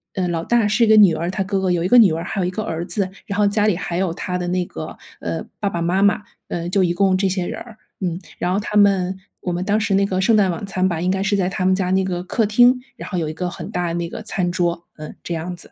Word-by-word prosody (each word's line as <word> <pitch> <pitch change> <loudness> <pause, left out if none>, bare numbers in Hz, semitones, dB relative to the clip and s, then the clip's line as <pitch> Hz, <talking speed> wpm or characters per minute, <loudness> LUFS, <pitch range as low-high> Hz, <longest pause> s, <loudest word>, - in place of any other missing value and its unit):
呃， 185 -2 0
老 165 -1 -2
大 235 -1 +2
是 215 +3 +2
一 - - -1
个 220 0 +6
女 195 -6 +7
儿， 170 +3 -2
她 195 - -3
哥 195 0 -1
哥 185 -1 +1
有 175 -1 +1
一 - - +1
个 245 - +6
女 210 -8 +7
儿， 165 +1 -2
还 195 +2 -3
有 - - +1
一 180 - -1
个 215 +3 -3
儿 170 -3 -3
子， 195 -1 -2 0.2
然 200 0 -3
后 205 - +4
家 210 +1 +1
里 210 -5 +3
还 170 - -4
有 185 -3 0
她 180 +1 -3
的 180 - -3
那 180 0 0
个 - - -8 0.2
呃， - - -3 0.2
爸 200 - +1
爸 170 -3 -3
妈 180 +3 +1
妈 205 +1 +3 0.3
呃， 170 0 -3
就 190 0 +2
一 175 -1 +1
共 190 0 +2
这 195 0 +1
些 185 -1 -2
人 - - -5
儿。 225 -2 -12 0.3
嗯， 175 0 -2 0.2
然 180 - -1
后 200 - +1
他 210 0 -5
们 190 -2 +3 0.2
我 180 - -3
们 175 +1 -2
当 210 +2 +1
时 210 -2 0
那 195 +1 +3
个 185 -1 -1
圣 215 +4 +4
诞 195 -4 +3
晚 170 +4 -5
餐 185 -1 0
吧， 165 -2 -2
应 180 +2 0
该 190 +1 0
是 200 +1 +1
在 180 -2 +1
他 185 -1 -2
们 190 - +4
家 185 -1 0
那 190 0 +3
个 180 -2 -2
客 220 +4 0
厅， 245 +4 +4 0.2
然 - - -8
后 185 - -3
有 160 -2 -1
一 - - -5
个 180 +2 -3
很 175 +3 -8
大 180 -1 -1
的 165 - -2
那 170 -1 -2
个 - - -7
餐 185 -4 -2
桌， 175 -1 -1
嗯， 155 0 -8
这 170 - -4
样 175 +2 -4
子。 175 - -14
185 Hz, 335 characters per minute, -21 LUFS, 175-200 Hz, 0.3 s, 女